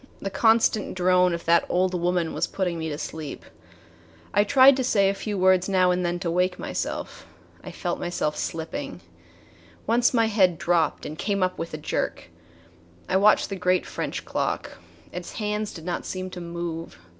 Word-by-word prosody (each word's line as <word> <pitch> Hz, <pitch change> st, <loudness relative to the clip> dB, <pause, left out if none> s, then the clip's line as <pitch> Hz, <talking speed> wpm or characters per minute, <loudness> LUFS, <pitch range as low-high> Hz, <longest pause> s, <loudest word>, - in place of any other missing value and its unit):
The 195 Hz, -, -4 dB
constant 220 Hz, 0 st, +2 dB
drone 180 Hz, 0 st, +4 dB
of 170 Hz, 0 st, -4 dB
that 170 Hz, 0 st, +4 dB
old 185 Hz, +1 st, +1 dB
woman 175 Hz, -1 st, 0 dB
was -, -, -1 dB
putting 180 Hz, -4 st, -2 dB
me 160 Hz, 0 st, -3 dB
to 145 Hz, -, -4 dB
sleep. 155 Hz, -1 st, -6 dB, 0.9 s
I 205 Hz, -, +4 dB
tried 270 Hz, +3 st, +7 dB
to 260 Hz, -, 0 dB
say 200 Hz, -5 st, +3 dB
a -, -, +1 dB
few 205 Hz, +1 st, -4 dB
words 185 Hz, 0 st, +3 dB
now 185 Hz, -2 st, +3 dB
and 180 Hz, 0 st, 0 dB
then 175 Hz, 0 st, -1 dB
to 170 Hz, -3 st, -1 dB
wake 180 Hz, +1 st, +1 dB
myself. -, -, -5 dB, 0.4 s
I -, -, -7 dB
felt -, -, -3 dB
myself 155 Hz, -3 st, -2 dB
slipping. 165 Hz, -, -5 dB, 0.8 s
Once 240 Hz, +2 st, +3 dB
my 230 Hz, -2 st, +3 dB
head 190 Hz, -6 st, +3 dB
dropped 170 Hz, -1 st, +1 dB
and 155 Hz, +1 st, -7 dB
came 200 Hz, -2 st, 0 dB
up 185 Hz, 0 st, -1 dB
with 165 Hz, -2 st, -4 dB
a -, -, -5 dB
jerk. 120 Hz, -, -3 dB, 0.8 s
I -, -, 0 dB
watched 210 Hz, +2 st, +4 dB
the -, -, -2 dB
great 180 Hz, -1 st, +1 dB
French -, -, -4 dB
clock. -, -, -3 dB, 0.3 s
Its 180 Hz, 0 st, -7 dB
hands 210 Hz, -1 st, -2 dB
did 165 Hz, -2 st, -10 dB
not 175 Hz, -1 st, -3 dB
seem 185 Hz, 0 st, -5 dB
to 180 Hz, -, -7 dB
move. 170 Hz, -, -5 dB
180 Hz, 180 wpm, -25 LUFS, 170-200 Hz, 0.9 s, tried